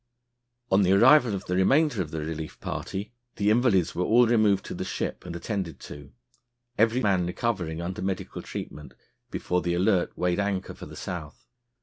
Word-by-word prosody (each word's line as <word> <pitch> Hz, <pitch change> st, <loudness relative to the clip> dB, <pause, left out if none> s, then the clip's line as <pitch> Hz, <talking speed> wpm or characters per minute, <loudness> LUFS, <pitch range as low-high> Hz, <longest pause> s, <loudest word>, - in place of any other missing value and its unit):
On 95 Hz, +1 st, +5 dB
the 95 Hz, 0 st, +4 dB
arrival 120 Hz, +1 st, +6 dB
of 95 Hz, -, -6 dB
the 90 Hz, -, -1 dB
remainder 135 Hz, -, +3 dB
of 80 Hz, -, -4 dB
the 80 Hz, 0 st, -4 dB
relief 80 Hz, 0 st, -6 dB
party, 105 Hz, +4 st, -5 dB, 0.2 s
the 105 Hz, +1 st, +2 dB
invalids 110 Hz, -7 st, +3 dB
were 90 Hz, -, -1 dB
all 120 Hz, +5 st, +5 dB
removed 110 Hz, -4 st, +3 dB
to -, -, -6 dB
the -, -, -4 dB
ship -, -, -4 dB
and 85 Hz, -, -6 dB
attended 95 Hz, -2 st, -4 dB
to, 70 Hz, -1 st, -10 dB, 0.6 s
every 115 Hz, +3 st, +2 dB
man 95 Hz, -4 st, +2 dB
recovering, 90 Hz, -5 st, -2 dB
under 90 Hz, +1 st, -4 dB
medical 95 Hz, -1 st, -3 dB
treatment, 75 Hz, -, -8 dB, 0.3 s
before 90 Hz, 0 st, -1 dB
the 85 Hz, 0 st, -1 dB
Alert 90 Hz, 0 st, +1 dB
weighed 90 Hz, +1 st, 0 dB
anchor 100 Hz, -2 st, -2 dB
for -, -, -10 dB
the -, -, -11 dB
South. 80 Hz, -5 st, -7 dB
95 Hz, 180 wpm, -26 LUFS, 85-110 Hz, 0.6 s, arrival